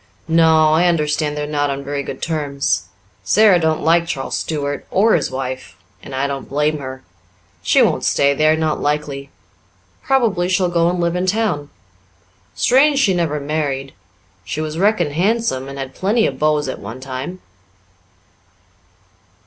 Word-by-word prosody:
"No, 160 -1 +4
I 170 +3 +3
understand 150 -2 0
they're 150 - -2
not 145 -1 -1
on 140 0 -3
very 140 0 -3
good 135 -1 -7
terms. 145 - -1 0.4
Sara 205 -4 +5
don't 160 -1 0
like 170 +1 +3
Charles 135 -5 -3
Stuart 145 -2 -3
or 215 +4 +3
his 155 - +1
wife 130 0 -5 0.2
and 130 - -8
I 135 +1 0
don't 140 -1 -5
blame 150 +2 0
her. 130 -1 -8 0.6
She - - +4
won't - - +1
stay 140 0 +3
there, 155 +2 +3
not 155 -1 -1
likely. 145 -2 -2 0.7
Probably 215 -10 +1
she'll 185 -1 +2
go 170 -1 +2
and 180 0 -2
live 170 0 0
in 180 +1 -1
town. 185 -8 0 0.9
Strange 275 +3 +4
she 240 -9 +3
never 165 -4 -1
married. 140 -2 -3 0.5
She - - -5
was 155 +1 -3
reckoned 185 -7 +2
handsome, 185 - 0
and 140 - -8
had 135 -1 -6
plenty 220 +4 +1
of 135 - -3
beaus 150 -1 +1
at 130 - -5
one 115 +5 -8
time." 130 +7 -6
155 Hz, 155 wpm, -19 LUFS, 140-175 Hz, 0.9 s, Sara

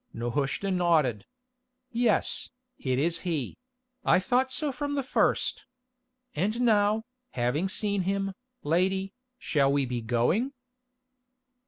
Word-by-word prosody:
Nehushta 135 - -1
nodded. 165 - +2 0.6
"Yes, 235 -3 +1 0.3
it 130 -2 0
is 165 +4 +1
he; 160 -8 -3 0.4
I - - +5
thought 255 +7 +1
so 300 +1 -2
from 285 +1 -3
the 275 - 0
first. 255 - +1 0.7
And 210 +9 0
now, 215 -2 +3 0.3
having 130 +10 0
seen 205 0 0
him, 195 +1 -1 0.3
lady, 190 +5 +1 0.2
shall 140 - +2
we 140 -1 +2
be 120 -1 -3
going?" 125 - +1
185 Hz, 115 wpm, -28 LUFS, 140-215 Hz, 0.7 s, I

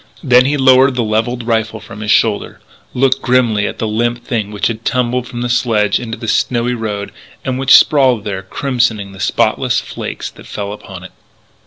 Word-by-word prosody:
Then 125 -3 +5
he 145 +2 +1
lowered 130 0 +5
the 120 - 0
levelled 115 +3 -1
rifle 110 -1 -1
from 105 0 -11
his 105 0 -5
shoulder, 105 0 +1 0.4
looked 130 +1 +2
grimly 120 -5 +2
at - - -6
the 110 - -2
limp 120 +2 -1
thing 110 -5 -2
which 105 -1 -3
had 115 -1 -2
tumbled 125 0 -1
from 120 0 -6
the 125 - -1
sledge 110 -4 +1
into 115 -1 -6
the 115 - -7
snowy 120 +2 0
road 105 -4 -4 0.3
and 130 -1 -2
which 135 -1 +7
sprawled 130 -7 +3
there 100 -3 -4
crimsoning 115 -1 -1
the 95 - -13
spotless - - +1
flakes - - -6
that - - -15
fell 100 -1 -5
upon 95 -3 -10
it. 95 - -11
115 Hz, 190 wpm, -15 LUFS, 105-125 Hz, 0.4 s, which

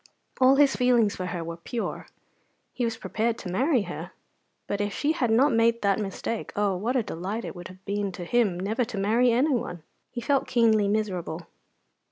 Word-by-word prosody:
All 260 +1 +6
his 280 -1 +4
feelings 240 -4 +3
for 185 - -4
her 175 -2 -4
were 165 0 -6
pure. 230 +7 -4 0.7
He 250 - -2
was 230 -1 -2
prepared 225 +1 -1
to 180 - -6
marry 255 - +2
her; - - -7 0.5
but 205 0 -2
if 205 0 -1
she 295 - +1
had 260 -7 0
not 260 +6 +4
made 230 0 +2
that 200 +1 +2
mistake, 215 +2 -4
oh, 205 -2 +1
what 225 +8 -1
a 250 - +2
delight 200 +6 -4
it - - -6
would 175 0 -8
have 185 +1 -15
been 200 0 -1
to 180 - -6
him 205 -4 +1
never 215 +6 0
to 220 -2 -6
marry 225 +5 +3
anyone! 240 - 0 0.3
He 245 - -6
felt 275 +3 +1
keenly 220 -4 +3
miserable. 185 -5 -2
220 Hz, 195 wpm, -26 LUFS, 195-240 Hz, 0.7 s, All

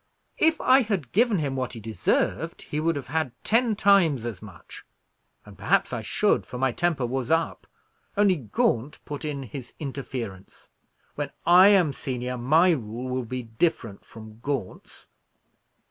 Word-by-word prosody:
"If 320 0 +3
I 260 +1 +5
had 195 - -2
given 230 0 +3
him 140 -4 -2
what 130 -1 -3
he 115 - -7
deserved, 110 -4 -1
he 150 - -4
would 165 +1 +1
have 140 -2 -6
had 155 -4 -1
ten 230 0 +2
times 190 - +3
as 110 -6 -5
much; 100 -7 -12 0.6
and - - -13
perhaps - - +1
I - - -2
should, - - +1
for 125 - -8
my 130 0 +1
temper 165 -4 0
was 130 +2 -3
up, 165 +1 0 0.5
only 200 -3 +4
Gaunt 120 +2 -1
put 145 +1 -6
in 145 -3 -4
his 125 +1 -9
interference. 125 -9 -7 0.4
When 145 -1 -4 0.2
I 180 +3 +8
am 185 -8 +4
senior, 125 -1 -4
my 155 +9 +4
rule 120 -3 -3
will 125 -1 -2
be 125 +2 -5
different 115 - -2
from 110 0 -13
Gaunt's." 135 -6 -5
135 Hz, 160 wpm, -25 LUFS, 120-170 Hz, 0.6 s, I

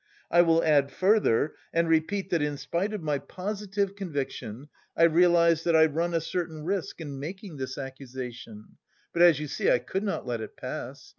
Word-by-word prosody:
I 175 - +7
will 165 -1 +3
add 145 -3 +4
further 185 - +2 0.2
and 170 0 +1
repeat 185 +5 0
that 170 -3 +2
in 145 -1 -1
spite 180 +8 -2
of 210 -5 -5
my 150 -2 0
positive 200 +2 -3
conviction, 140 - -5 0.3
I 165 - +4
realise 170 0 +5
that 170 -1 +2
I 160 0 +7
run 165 +3 -1
a 165 - +1
certain 165 -2 -4
risk 190 -2 -2
in 145 -4 -6
making 175 +3 -7
this 130 -1 -5
accusation, 130 -4 -8 0.4
but 170 - +1
as 170 -4 +7
you 150 - -4
see, - - 0
I - - +5
could 190 +9 -3
not 205 -2 -2
let 120 -3 -3
it 110 - -8
pass. - - -7
165 Hz, 190 wpm, -27 LUFS, 140-180 Hz, 0.4 s, I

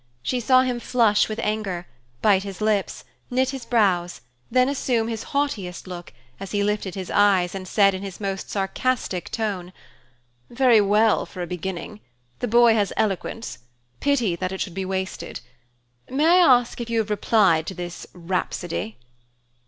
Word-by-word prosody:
She 250 - -1
saw 255 +2 +4
him 250 -2 -1
flush 230 -4 +2
with 215 - -4
anger, 200 -5 -2 0.4
bite 200 -3 +5
his 195 -2 -7
lips, 215 -2 0 0.3
and 250 - -6
knit 260 0 +2
his 270 -3 -7
brows, 185 -7 +1 0.3
then 255 +1 +3
assume 250 -5 0
his 225 -1 -3
haughtiest 225 -12 -2
look, 175 -2 -8 0.3
as 195 0 -7
he 205 -1 +1
lifted 205 -2 -1
his 190 -2 -5
eyes 195 -4 +3
and 190 -1 -6
said 195 0 +4
in 190 - -5
his 195 -2 -7
most 195 -2 -4
sarcastic 195 -1 -1
tone, 200 -6 -3 0.8
"Very 240 -3 +4
well 210 +2 +3
for 180 - -6
a - - -2
beginning. 175 - -5 0.4
The - - -1
boy 235 +1 +6
has 205 -3 +1
eloquence. 215 - -2 0.4
Pity 245 -11 +1
that 185 +1 -3
it 190 - -5
should 180 - -3
be 190 +1 -3
wasted. 190 0 -4 0.7
May 280 +4 +1
I 345 +2 +6 0.2
ask 240 0 -9
if 235 - -5
you 230 - 0
have 220 -1 0
replied 195 -6 +3
to 190 - -5
this 175 -1 -7
rhapsody?" 165 - -3
205 Hz, 170 wpm, -23 LUFS, 185-230 Hz, 0.8 s, boy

